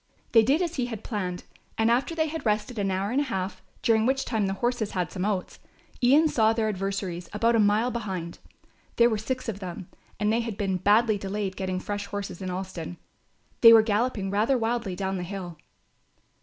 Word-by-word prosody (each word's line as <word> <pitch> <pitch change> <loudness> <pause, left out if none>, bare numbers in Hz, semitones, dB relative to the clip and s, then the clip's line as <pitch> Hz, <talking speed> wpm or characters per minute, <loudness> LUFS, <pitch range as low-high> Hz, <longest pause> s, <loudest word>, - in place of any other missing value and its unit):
They 225 - +7
did 280 +10 +2
as 345 -2 -3
he 250 -2 0
had 225 -4 -6
planned, 185 -6 -3 0.3
and 225 +1 +3
after 260 +7 +1
they 315 -1 +2
had 320 +1 -5
rested 215 +2 -1
an 195 -1 0
hour 190 +2 -1
and 270 +3 +2
a - - -1
half, 190 -6 -3 0.2
during 225 -1 +3
which 270 +1 +1
time 220 -4 0
the 195 - -2
horses 240 0 -1
had 180 -2 -2
some 185 0 -3
oats, 200 -3 -2 0.4
Ian 280 +6 +5
saw 220 -6 +3
their 225 -1 0
adversaries 190 -3 -3
about 230 +2 +2
a - - +3
mile 215 +4 +3
behind. 190 -8 -5 0.6
There 235 0 +5
were 215 - 0
six 255 +3 -3
of 210 -3 -4
them 180 -2 -7 0.3
and 210 +1 +2
they 230 - +2
had 230 -3 -4
been 195 -2 0
badly 210 +3 +3
delayed 195 0 -3
getting 185 -1 -2
fresh 205 +1 -4
horses 200 -3 -5
in 185 - -3
Alston. 180 -2 -5 0.6
They 230 -1 +10
were 225 -1 +8
galloping 215 -2 0
rather 220 +6 +2
wildly 230 -4 -1
down 190 +1 -2
the - - -4
hill. 175 -3 -7
210 Hz, 205 wpm, -26 LUFS, 190-235 Hz, 0.6 s, They